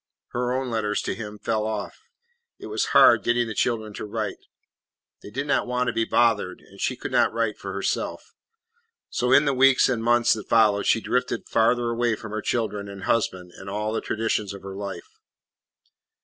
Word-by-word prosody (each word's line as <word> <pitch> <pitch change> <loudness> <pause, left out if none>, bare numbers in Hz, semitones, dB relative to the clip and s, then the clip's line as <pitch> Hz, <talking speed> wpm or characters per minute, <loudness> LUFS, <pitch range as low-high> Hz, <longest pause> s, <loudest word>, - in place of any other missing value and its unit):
Her 125 0 -2
own 130 -1 -2
letters 105 -2 -1
to - - -2
him 105 -2 -7
fell 110 0 -1
off. 110 -1 -4 0.6
It - - -10
was - - -1
hard - - +6
getting 120 0 +1
the 110 - -4
children 110 -1 -1
to - - -6
write. 105 - -4 0.8
They - - -10
did 135 +7 -3
not 145 - +1
want 125 0 0
to - - -3
be 115 - +1
bothered, 115 -7 +1
and - - -15
she - - 0
could - - -6
not - - +3
write 115 -3 -1
for 100 - -6
herself. 100 0 -3 0.8
So 125 +1 0
in 140 +3 +6
the 140 - +2
weeks 135 0 +5
and 120 -3 -1
months 120 0 +4
that 105 -2 -7
followed 105 -3 +4
she 115 - +3
drifted 125 +3 -1
farther 120 +1 +2
away 115 -1 +1
from 110 0 -9
her 110 0 -3
children 105 -4 -2
and 100 -1 -9
husband 95 -6 -1
and 95 - -9
all 105 +2 -2
the - - -1
traditions 105 -2 -2
of 100 - -12
her 95 0 -7
life. 100 -3 -8
110 Hz, 195 wpm, -24 LUFS, 105-120 Hz, 0.8 s, hard